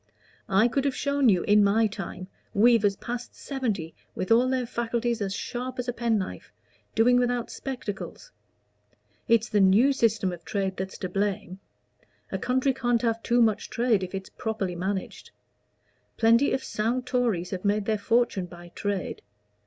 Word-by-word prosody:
I 195 +4 +4
could 270 +3 0
have 275 - 0
shown 280 -2 +2
you, 185 -4 +3
in 210 0 +5
my 210 +3 +3
time, 195 -3 -5 0.3
weavers 210 -2 +4
past 240 +3 -6
seventy, 215 - -3 0.2
with 185 - -3
all 245 +3 +5
their 255 -1 0
faculties 235 0 -2
as 195 -1 -1
sharp 250 +5 -4
as 250 0 -3
a 245 - -1
pen 230 -2 +1
knife, 190 -2 -5 0.4
doing 245 +3 +5
without 245 -1 0
spectacles. 255 - -6 1.0
It's 230 0 +3
the 210 - +1
new 205 +8 +5
system 220 -7 +1
of 175 - -10
trade 195 -2 -2
that's 190 +1 -5
to 185 - -3
blame: 195 -1 -2 0.7
a - - -2
country 260 +2 +1
can't 245 -2 0
have 230 -1 0
too 240 +1 +3
much 220 -2 0
trade 230 -4 +2
if 185 +1 -5
it's 190 0 -6
properly 215 -5 -3
managed. 190 +2 -4 0.9
Plenty 230 +5 +4
of 265 - -1
sound 235 +4 -1
Tories 235 -9 0
have 185 -2 -4
made 205 0 +1
their 215 -1 0
fortune 225 -4 +1
by 175 0 -12
trade. 200 +1 -3
225 Hz, 165 wpm, -26 LUFS, 195-245 Hz, 1.0 s, in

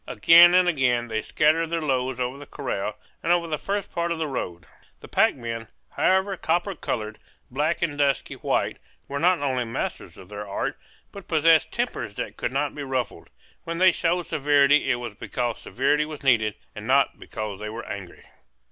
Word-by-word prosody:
Again 175 +1 +7
and 185 -1 +5
again 125 -7 +1
they 110 -1 -1
scattered 160 +5 +2
their 170 0 -1
loads 130 -4 -1
over 125 +2 -2
the 145 - -11
corral 105 -7 -4 0.2
and 165 - 0
over 175 -1 +3
the 155 -2 -2
first 200 0 -3
part 170 0 -1
of 170 - -1
the 160 - -1
road. 90 -11 -5 0.3
The - - -12
pack - - +3
men, 115 -3 -5 0.2
however 190 +1 +2
copper 175 +5 0
colored, 110 - -4 0.3
black, 155 +6 0
and 145 -4 -2
dusky 140 -1 +1
white - - -1 0.3
were 140 0 -3
not 175 -2 +3
only 130 -3 0
masters 115 0 -5
of 90 - -13
their 105 0 -7
art, 100 - -2 0.4
but 200 -2 -11
possessed 160 -2 +4
tempers - - -3
that - - -5
could - - -3
not 140 +2 -1
be 150 - -7
ruffled; 130 -3 -3 0.3
when 165 0 -4
they 185 +1 +6
showed 175 +1 0
severity 145 0 +3
it - - +3
was 120 -3 -6
because 120 +2 -3
severity 145 +4 +1
was 150 -2 -9
needed, 110 -6 +3 0.2
and - - -8
not - - +3
because 105 -2 -6
they 105 0 -5
were 115 +2 -7
angry. 95 -3 -8
140 Hz, 190 wpm, -25 LUFS, 120-165 Hz, 0.4 s, Again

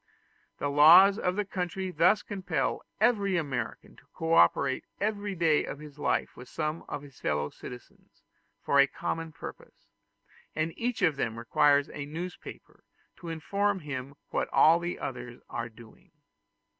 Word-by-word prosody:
The - - -2
laws 175 +8 +8
of 180 0 0
the 210 0 -1
country 185 0 -3
thus 180 +6 +3
compel 180 -9 -2 0.2
every 200 -4 +2
American 145 -6 -4
to - - -19
co 165 0 -1
operate 130 - +4 0.2
every 205 -1 -2
day 165 -3 +3
of - - -6
his 150 -1 -12
life - - -1
with 125 0 -12
some 155 +1 -3
of 145 - -5
his 140 -3 -15
fellow 75 0 -1
citizens 125 -1 -13 0.4
for 140 - +3
a 140 - +7
common 165 +3 -4
purpose, - - -11 0.7
and 155 +1 -1
each 240 0 -2
one 180 - +6
of 145 - -10
them 115 -4 -2
requires 140 +5 +3
a 145 -1 -6
newspaper 175 +4 -8 0.3
to 170 - -8
inform 200 +4 -1
him 140 -2 -6 0.2
what - - -1
all 165 +2 +6
the 175 +1 -4
others 125 -2 -6
are 115 0 -4
doing. 110 0 -17
155 Hz, 155 wpm, -29 LUFS, 140-185 Hz, 0.7 s, laws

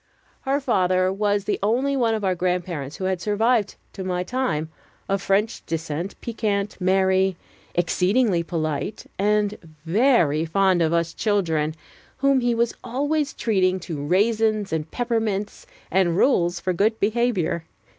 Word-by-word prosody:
Her 275 +1 +1
father 185 -7 +2
was 205 0 0
the 210 - -1
only 250 +7 +1
one 230 -4 +2
of 215 - -4
our 185 - +2
grandparents 175 -5 -2
who - - -7
had 185 -1 -1
survived 215 +1 +1 0.2
to 190 - -6
my 180 -1 -1
time, 180 -9 -2 0.4
of 195 -1 0
French 205 +4 0
descent, 165 +3 -4
piquant, 210 -3 -2
merry, 190 0 +2 0.4
exceedingly 180 +3 +2
polite, 160 +1 -3
and 210 +1 +1 0.3
very 175 - +3
fond 185 +2 +2
of 160 -1 +2
us 170 0 0
children, 165 -8 0 0.4
whom 275 0 +3
he 240 -1 +1
was 235 0 +1
always 290 +3 -1
treating 190 -4 +1
to 160 -4 -5
raisins 215 +3 +1
and 160 0 -2
peppermints 225 -4 -2 0.2
and 175 -2 +2
rules 175 -8 +2
for 185 - -1
good 215 +5 +1
behavior. 210 -7 0
195 Hz, 140 wpm, -23 LUFS, 175-225 Hz, 0.4 s, very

